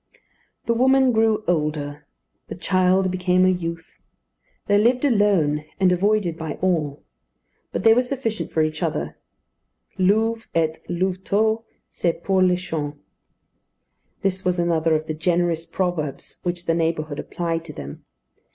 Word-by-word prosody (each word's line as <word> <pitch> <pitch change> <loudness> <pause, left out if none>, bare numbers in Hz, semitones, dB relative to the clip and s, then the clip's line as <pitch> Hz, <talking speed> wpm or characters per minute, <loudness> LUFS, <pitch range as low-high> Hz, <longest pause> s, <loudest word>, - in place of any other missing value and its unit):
The 235 - +2
woman 265 +2 +4
grew 220 -1 +2
older; 150 -3 -2 0.4
the - - -6
child 185 +1 +2
became 185 0 +2
a - - +5
youth. 170 -2 -4 0.6
They 205 0 +3
lived 245 +5 +3
alone 200 - +2 0.2
and 185 -1 +4
avoided 185 -2 +1
by 160 -2 -3
all; 155 -6 -1 0.7
but - - -3
they 225 - +7
were 245 - +4
sufficient 245 -4 -3
for 160 - +2
each 155 0 -2
other. - - -2 0.8
Louve 220 +4 +2
et 160 -1 +1
louveteau 195 +5 0 0.3
se 170 - 0
pourlèchent. 175 -4 0 1.3
This 190 -1 0
was 180 0 +1
another 165 -2 +2
of 155 0 -1
the 155 - -3
generous 170 0 0
proverbs 170 -5 -3
which 175 0 -3
the 165 - +2
neighbourhood 160 -3 -1
applied 165 0 -3
to 155 - -8
them. 70 - -9
180 Hz, 135 wpm, -23 LUFS, 160-205 Hz, 1.3 s, they